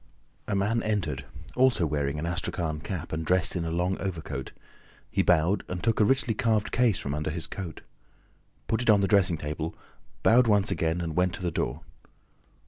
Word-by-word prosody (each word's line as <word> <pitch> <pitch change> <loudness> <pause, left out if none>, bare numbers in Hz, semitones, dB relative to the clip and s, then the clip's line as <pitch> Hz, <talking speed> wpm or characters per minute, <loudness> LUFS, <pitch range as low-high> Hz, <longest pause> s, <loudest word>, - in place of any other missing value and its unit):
A 105 - 0
man 105 +4 +1
entered, 85 -11 -2 0.3
also 125 -8 +3
wearing 75 -1 -1
an 75 - -3
astrakhan 85 -2 -2
cap 80 0 -5
and 80 +1 -2
dressed 90 +4 +1
in 85 -2 -1
a - - -2
long 90 +3 -1
overcoat. 80 -8 -4 0.6
He - - +2
bowed 90 +3 +3
and 90 -1 -5
took 115 -1 +1
a - - +6
richly 130 0 +2
carved 110 -1 +1
case 120 -5 +3
from 70 - -4
under 75 +1 -2
his 80 +1 -2
coat, 90 -4 -6 0.9
put 110 - 0
it 120 - 0
on 105 -2 +6
the 100 - +2
dressing 90 -4 +3
table, 75 +2 -4 0.5
bowed 120 +1 +5
once 105 -2 +3
again 85 -1 0
and 80 -2 -4
went 90 0 +2
to 90 - -8
the 85 - 0
door. - - -2
90 Hz, 190 wpm, -27 LUFS, 80-105 Hz, 0.9 s, a